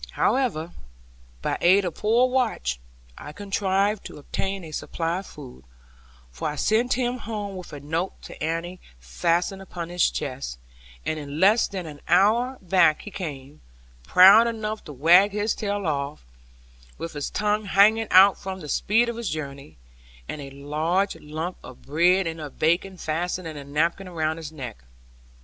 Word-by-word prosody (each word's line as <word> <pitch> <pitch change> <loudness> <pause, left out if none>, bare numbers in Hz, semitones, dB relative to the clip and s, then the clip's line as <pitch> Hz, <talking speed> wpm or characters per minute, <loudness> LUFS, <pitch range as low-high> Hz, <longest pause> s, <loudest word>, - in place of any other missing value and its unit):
However, 200 -12 0 0.7
by - - -1
aid 190 +3 +5
of 175 - -2
poor 230 +7 +3
Watch, 230 - -1 0.4
I 150 - -8
contrived 200 +1 0
to - - -11
obtain 190 +6 -4
a 160 - -9
supply 165 +3 -2
of 195 - -10
food; 130 - -12 0.7
for - - -3
I 150 - -5
sent 225 - +2
him 250 0 -1
home 205 -3 -5
with 180 -1 -9
a 145 - -7
note 160 +6 -3
to - - -9
Annie 165 +3 -3 0.2
fastened 170 - -1
upon 175 -3 -7
his 175 -1 +2
chest; 130 - -5 0.5
and 155 - -2
in 145 +1 -6
less 205 +5 +5
than 190 -3 -5
an 150 -2 -10
hour 225 +9 +3
back 180 -4 +3
he 210 - -8
came, 150 -7 -7 0.4
proud 195 - +7
enough 220 -2 -4
to - - -8
wag 175 +9 +5
his 210 +1 0
tail 205 -2 -3
off, 140 - -3 0.7
with 165 - -6
his 145 -1 -4
tongue 210 0 0
hanging 215 +3 +4
out 190 +1 +7
from 190 0 -6
the 150 -4 -9
speed 225 +9 +2
of 235 -1 -4
his 235 -5 -3
journey, 140 - -6 0.5
and 150 - -5
a 135 - -8
large 155 +8 -1
lump 155 +4 -5
of 125 - -12
bread 175 +6 +3
and 165 -1 -4
of 145 -2 -8
bacon 180 +4 +1
fastened 175 +2 -3
in 155 - -7
a 145 - -7
napkin 165 +7 -1
around 160 -3 -2
his 160 -2 -7
neck. 125 - -8
175 Hz, 165 wpm, -25 LUFS, 150-200 Hz, 0.7 s, proud